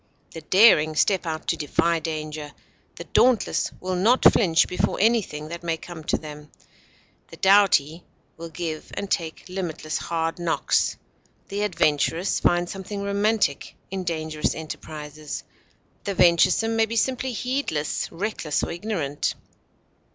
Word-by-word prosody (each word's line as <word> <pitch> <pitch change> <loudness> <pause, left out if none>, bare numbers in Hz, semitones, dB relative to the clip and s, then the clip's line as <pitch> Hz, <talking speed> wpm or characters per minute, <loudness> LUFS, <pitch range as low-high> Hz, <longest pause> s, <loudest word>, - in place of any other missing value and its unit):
The 165 - -8
daring 155 -3 +5
step 185 +2 +2
out 155 -1 -4
to - - +2
defy 165 +2 +1
danger; 155 -2 -5 0.4
the - - -7
dauntless 250 -4 +2
will 185 0 -3
not 225 +8 +3
flinch 170 -6 +3
before 180 - -1
anything 195 -9 +1
that 170 +1 -6
may 165 -1 -2
come 165 -1 -10
to - - +1
them; 150 -1 -10 0.8
the - - -13
doughty 190 -5 +4 0.3
will 165 0 -8
give 160 -1 -5
and 200 - -5
take 165 -3 -2
limitless 175 -4 -4
hard 165 0 -2
knocks. 170 -2 +1 0.5
The 200 +1 -3
adventurous 170 -2 +1
find 175 0 +2
something 195 +2 -6
romantic 200 -5 0 0.2
in 190 -1 -3
dangerous 155 -3 -2
enterprises; 155 -1 -7 0.6
the 200 - -3
venturesome 180 +6 +4
may 225 0 +3
be 230 - -4
simply 260 +2 0
heedless, 245 - -2
reckless, 170 -4 -2
or - - -2
ignorant. 170 -6 -2
170 Hz, 135 wpm, -24 LUFS, 155-200 Hz, 0.8 s, daring